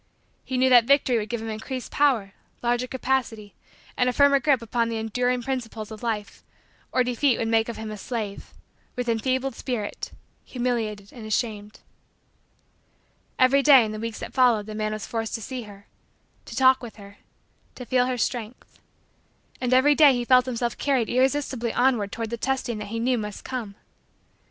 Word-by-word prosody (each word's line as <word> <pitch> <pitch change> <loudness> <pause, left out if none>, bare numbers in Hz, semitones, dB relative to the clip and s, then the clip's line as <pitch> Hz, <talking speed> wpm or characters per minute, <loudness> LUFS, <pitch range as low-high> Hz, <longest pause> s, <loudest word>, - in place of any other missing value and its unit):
He 260 - -3
knew 260 +1 +3
that 240 -2 +7
victory 265 -3 +3
would 210 0 -5
give 235 -1 -3
him 225 - -5
increased 250 +4 -6
power, 245 -9 +2 0.3
larger 245 +1 0
capacity, 245 -5 -2 0.4
and 250 0 +2
a - - -2
firmer 280 +1 +5
grip 275 -2 +3
upon 230 0 -1
the 230 - -3
enduring 245 +3 -1
principles 230 -5 -4
of 215 - -9
life 220 -3 -4 0.5
or 255 - +3
defeat 250 +1 +1
would 225 - -1
make 225 0 +2
of 235 - -5
him 220 -1 -6
a 215 - -6
slave, 215 -3 -5 0.4
with 245 -1 -3
enfeebled 255 +3 0
spirit, 230 -4 -4 0.3
humiliated 225 -5 -3
and 225 -4 -9
ashamed. 215 -1 -3 1.6
Every 260 +2 +4
day, 270 -4 +7
in 215 - -4
the 215 - -6
weeks 230 -1 -5
that - - -7
followed, 245 -5 +3
the 215 - -7
man 215 0 -2
was 215 -1 -5
forced 225 -1 -3
to 225 - -5
see 255 +2 -5
her 200 0 -14 0.6
to - - -9
talk 260 -1 +5
with 240 -3 -9
her 200 -1 -14 0.6
to 250 - -8
feel 250 0 +2
her 255 -1 -1
strength. 235 0 -4 0.8
And 250 -1 -1
every 260 +3 +5
day 290 -2 +6
he 245 -1 -2
felt 255 0 +5
himself 240 -1 -2
carried 265 -5 +1
irresistibly 260 -2 0
onward 240 -6 +2
toward 225 -1 -5
the 235 - -2
testing 250 -3 -2
that 210 - -5
he 230 +2 -4
knew 245 +1 +1
must 210 -1 -6
come. 235 -6 -5
240 Hz, 180 wpm, -25 LUFS, 220-255 Hz, 1.6 s, that